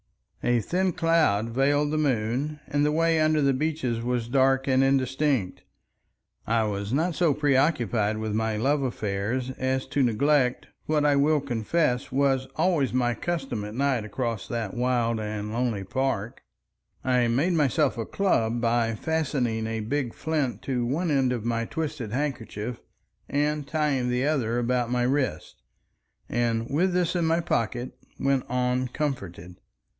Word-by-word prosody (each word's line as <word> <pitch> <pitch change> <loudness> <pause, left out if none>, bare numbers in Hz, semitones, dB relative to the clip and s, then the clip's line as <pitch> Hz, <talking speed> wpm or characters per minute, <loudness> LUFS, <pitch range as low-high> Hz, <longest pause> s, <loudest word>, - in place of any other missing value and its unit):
A 120 0 +3
thin 180 - 0
cloud 155 -12 +2
veiled 145 +4 +2
the 155 - 0
moon, 135 +2 -1
and 145 0 0
the 150 - +2
way 165 +1 +2
under 155 0 +3
the 140 -1 +3
beeches 130 -5 -1
was 120 -1 -1
dark 135 +1 +2
and 130 0 +4
indistinct. 135 -5 +1 0.9
I 115 0 +2
was 100 -1 -3
not 165 +6 +1
so 160 -4 +2
preoccupied 130 - +1
with 110 -1 -3
my 110 0 0
love 140 +6 +1
affairs 120 +1 -2
as 130 0 0
to 145 - +1
neglect 125 +2 +2 0.2
what 150 -1 +2
I 145 -1 +4
will 150 +2 +3
confess 125 +1 0
was 135 -1 +1
always 160 -8 +2
my 120 -1 +1
custom 135 -5 -3
at 105 +1 -7
night 135 -3 +1
across 115 -1 -3
that 115 -3 -3
wild 120 -2 0
and 105 0 -4
lonely 115 -4 -1
park. 120 0 -2 0.6
I 125 -2 +2
made 140 +10 +1
myself 150 -2 +2
a 115 - -3
club 120 - +1
by 115 -1 +1
fastening 130 -6 -1
a 110 0 -3
big 125 +2 -2
flint 155 -6 -2
to 125 -3 -1
one 155 +8 -1
end 135 -3 +2
of 120 -3 -3
my 115 0 0
twisted 145 -6 -4
handkerchief 125 -4 -3 0.5
and 150 0 0
tying 140 -5 0
the 125 +2 0
other 125 -6 0
about 120 0 0
my 125 0 +1
wrist, 130 - -1 0.7
and 115 -1 0
with 175 +8 +1
this 180 0 +1
in 170 -2 +1
my 165 +1 +2
pocket, 120 -5 -1 0.3
went 135 -1 +1
on 125 +1 0
comforted. 90 - -4
130 Hz, 155 wpm, -26 LUFS, 115-145 Hz, 0.9 s, and